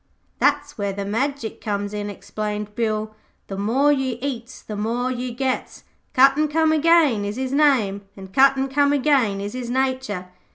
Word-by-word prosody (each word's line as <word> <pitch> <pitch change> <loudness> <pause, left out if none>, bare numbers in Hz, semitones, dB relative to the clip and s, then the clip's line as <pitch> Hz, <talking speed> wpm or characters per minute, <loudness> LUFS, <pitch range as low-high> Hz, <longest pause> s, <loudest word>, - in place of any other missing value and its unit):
'That's 290 -2 +1
where 200 -1 -1
the 200 0 -4
Magic 235 +3 -2
comes 205 -1 -3
in,' 205 0 -3
explained 210 +1 -5
Bill. 215 -1 -2 0.3
'The 195 - -6
more 250 +9 +2
you 265 -4 0
eats 250 -2 -5
the 215 - -6
more 235 +5 -1
you 250 0 -3
gets. 260 +2 -3 0.3
Cut 270 +1 +6
an' 305 - +3
come 320 +1 +2
again 310 -8 +4
is 205 +1 -3
his 260 +1 -3
name, 255 -10 +3 0.2
an' 190 -1 -10
cut, 270 +7 +5
an' 265 0 0
come 285 +1 +2
again, 265 -8 +2
is 205 +1 -5
his 250 -2 -5
nature. 260 -8 -1
245 Hz, 175 wpm, -22 LUFS, 210-275 Hz, 0.3 s, Cut